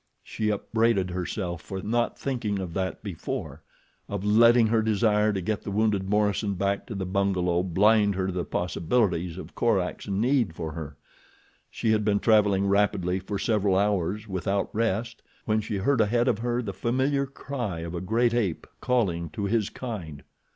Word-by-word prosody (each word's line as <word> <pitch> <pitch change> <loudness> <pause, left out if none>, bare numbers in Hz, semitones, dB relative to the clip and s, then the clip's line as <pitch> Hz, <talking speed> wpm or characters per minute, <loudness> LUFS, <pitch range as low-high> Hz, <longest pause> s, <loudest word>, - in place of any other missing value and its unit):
She 110 -1 -2
upbraided 105 -2 +1
herself 90 -1 -3
for 95 - -6
not 120 +4 -1
thinking 120 -7 -2
of 90 -3 -5
that 95 +2 -3
before—of 100 +1 -7
letting 115 +3 +6
her 110 0 +2
desire 110 -1 +2
to 95 -2 -2
get 105 +3 -2
the - - -6
wounded 100 -2 0
Morison 105 -1 +1
back 100 +2 -1
to 115 - -6
the 95 -1 -3
bungalow 90 -2 +1
blind 100 +3 +3
her 95 0 -1
to 95 - -2
the 90 -1 -2
possibilities 90 -1 0
of - - -9
Korak's 100 -6 0
need 110 - +1
for 80 -1 -4
her. 75 -2 -7 0.7
She 110 - -1
had 110 -1 +2
been 100 -1 +2
traveling 105 -3 +3
rapidly 100 -2 +1
for 100 +2 -4
several 100 -3 +1
hours 100 +1 0
without 95 +1 -2
rest 115 +1 -1 0.2
when 110 0 +1
she 105 -1 -3
heard 115 +5 +2
ahead 120 +4 +2
of 120 -4 +2
her 120 +1 -1
the 100 - -4
familiar 130 +7 0
cry 125 -10 -5
of 85 0 -6
a 85 - -3
great 115 +5 +1
ape 105 -9 -1
calling 90 -10 0
to 105 - -4
his 105 0 +1
kind. 90 - -7
100 Hz, 170 wpm, -26 LUFS, 95-115 Hz, 0.7 s, letting